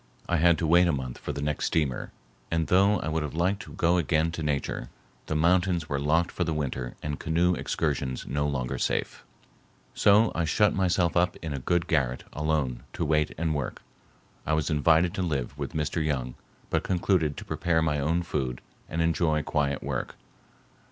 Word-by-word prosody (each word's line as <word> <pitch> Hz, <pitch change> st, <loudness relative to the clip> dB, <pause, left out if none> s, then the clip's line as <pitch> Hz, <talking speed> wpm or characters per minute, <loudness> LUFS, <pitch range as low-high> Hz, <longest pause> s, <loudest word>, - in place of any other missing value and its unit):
I 90 Hz, -, +1 dB
had 85 Hz, +1 st, +4 dB
to 85 Hz, -, -1 dB
wait 85 Hz, +3 st, +5 dB
a -, -, +3 dB
month 65 Hz, -4 st, -4 dB
for -, -, -4 dB
the 70 Hz, -, -4 dB
next 75 Hz, 0 st, -1 dB
steamer, 70 Hz, -6 st, -1 dB, 0.4 s
and 80 Hz, -1 st, 0 dB
though 100 Hz, +4 st, +4 dB
I -, -, -4 dB
would 80 Hz, 0 st, 0 dB
have 75 Hz, 0 st, -4 dB
liked 90 Hz, +4 st, +1 dB
to -, -, -11 dB
go 85 Hz, +1 st, +2 dB
again 80 Hz, -1 st, +1 dB
to 85 Hz, -, -5 dB
Nature, 70 Hz, -5 st, -2 dB, 0.4 s
the 80 Hz, -, -2 dB
mountains 85 Hz, 0 st, +2 dB
were 70 Hz, -, -1 dB
locked 80 Hz, +4 st, +2 dB
for 90 Hz, -, -1 dB
the 80 Hz, -2 st, -2 dB
winter 65 Hz, -4 st, -3 dB
and 75 Hz, -1 st, -3 dB
canoe 85 Hz, +3 st, +2 dB
excursions 65 Hz, -6 st, -2 dB
no 75 Hz, +2 st, -1 dB
longer 65 Hz, -4 st, -2 dB
safe. -, -, -1 dB, 0.7 s
So 105 Hz, +3 st, +5 dB
I 85 Hz, -, 0 dB
shut 105 Hz, +6 st, +3 dB
myself 90 Hz, -3 st, +1 dB
up 90 Hz, 0 st, +2 dB
in 80 Hz, -3 st, -3 dB
a 70 Hz, -, -3 dB
good 85 Hz, +6 st, +1 dB
garret 65 Hz, -6 st, 0 dB
alone 75 Hz, -5 st, -1 dB
to -, -, -2 dB
wait 75 Hz, 0 st, +1 dB
and 80 Hz, 0 st, 0 dB
work. 70 Hz, -4 st, -4 dB, 0.6 s
I 80 Hz, -, -1 dB
was 75 Hz, +1 st, 0 dB
invited 80 Hz, +3 st, +3 dB
to -, -, -2 dB
live 70 Hz, -7 st, -2 dB
with 70 Hz, +2 st, -5 dB
Mr. 75 Hz, +1 st, -1 dB
Young 65 Hz, -5 st, -2 dB, 0.4 s
but -, -, +2 dB
concluded 90 Hz, -5 st, +1 dB
to -, -, -7 dB
prepare 80 Hz, -2 st, 0 dB
my 75 Hz, -2 st, +1 dB
own 85 Hz, +5 st, +1 dB
food 65 Hz, -7 st, -2 dB, 0.3 s
and 80 Hz, 0 st, 0 dB
enjoy 80 Hz, -2 st, +1 dB
quiet 70 Hz, -1 st, -1 dB
work. -, -, -3 dB
80 Hz, 190 wpm, -27 LUFS, 70-85 Hz, 0.7 s, wait